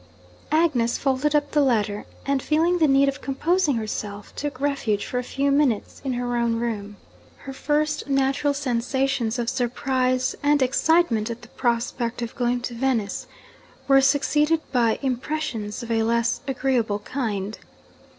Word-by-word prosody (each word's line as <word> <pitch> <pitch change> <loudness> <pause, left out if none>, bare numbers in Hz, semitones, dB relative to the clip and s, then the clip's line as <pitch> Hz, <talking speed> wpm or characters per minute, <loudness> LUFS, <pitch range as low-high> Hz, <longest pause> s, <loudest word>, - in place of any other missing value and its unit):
Agnes 295 -8 +2
folded 275 +2 +1
up 290 -1 +1
the 300 - +3
letter; 215 -6 0 0.2
and, 275 -1 +1
feeling 330 +5 +2
the 315 - +5
need 275 0 +4
of 275 0 -2
composing 300 +2 +1
herself, 210 -2 -5
took 290 -2 -4
refuge 275 -8 0
for 250 - -2
a - - -3
few 275 +3 0
minutes 275 -7 +1
in 265 -2 -1
her 245 0 -2
own 235 -1 +1
room. 210 -3 -3 0.4
Her 270 - -9
first 300 +2 -1
natural 275 +1 +1
sensations 265 -2 0
of 240 -1 -2
surprise 255 0 0
and 290 -1 +3
excitement 260 -4 +2
at 235 +1 -6
the - - -13
prospect 235 0 -1
of 230 - -5
going 245 0 0
to 245 - -4
Venice 235 -5 -1 0.6
were 270 -1 +6
succeeded 300 +3 +2
by 235 -4 +2
impressions 255 -4 -3
of 235 - -6
a 225 -1 +2
less 235 +1 +1
agreeable 255 -5 0
kind. 210 -3 -4
255 Hz, 150 wpm, -24 LUFS, 235-280 Hz, 0.6 s, were